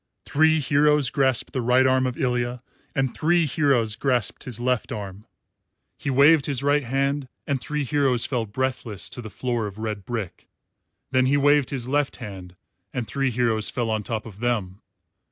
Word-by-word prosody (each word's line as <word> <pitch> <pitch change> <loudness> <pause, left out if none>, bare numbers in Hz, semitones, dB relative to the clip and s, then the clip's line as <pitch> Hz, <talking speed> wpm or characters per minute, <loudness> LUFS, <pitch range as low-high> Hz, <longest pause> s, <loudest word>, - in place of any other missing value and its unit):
Three 160 +1 +3
heroes 145 -2 +3
grasped 130 -2 +1
the 130 - -1
right 125 +2 +4
arm 130 0 +3
of 125 - -4
Ilya 125 -2 -1 0.3
and 135 -2 0
three 170 +1 +2
heroes 130 -7 +1
grasped 125 -5 -1
his 120 -3 -4
left 125 -1 -1
arm. 100 0 -7 0.7
He 145 - -5
waved 140 +3 +5
his 140 -2 -1
right 145 +1 +3
hand 135 +2 -1 0.2
and 135 -3 -1
three 150 -1 -2
heroes 135 -3 +2
fell 120 -4 -2
breathless 125 -3 -3
to 125 - -4
the 110 - -8
floor 120 +1 -2
of 100 0 -9
red 110 -2 -4
brick; 110 -3 -5 0.6
then 130 -1 +3
he 140 +2 +3
waved 145 -1 +4
his 130 -4 -4
left 145 +1 0
hand 95 -6 -9 0.4
and 120 -3 -4
three 135 -1 0
heroes 115 -3 +1
fell 120 -4 -2
on 110 -1 0
top 110 +1 -4
of 105 -3 -11
them. 110 -5 -2
125 Hz, 175 wpm, -24 LUFS, 115-140 Hz, 0.7 s, waved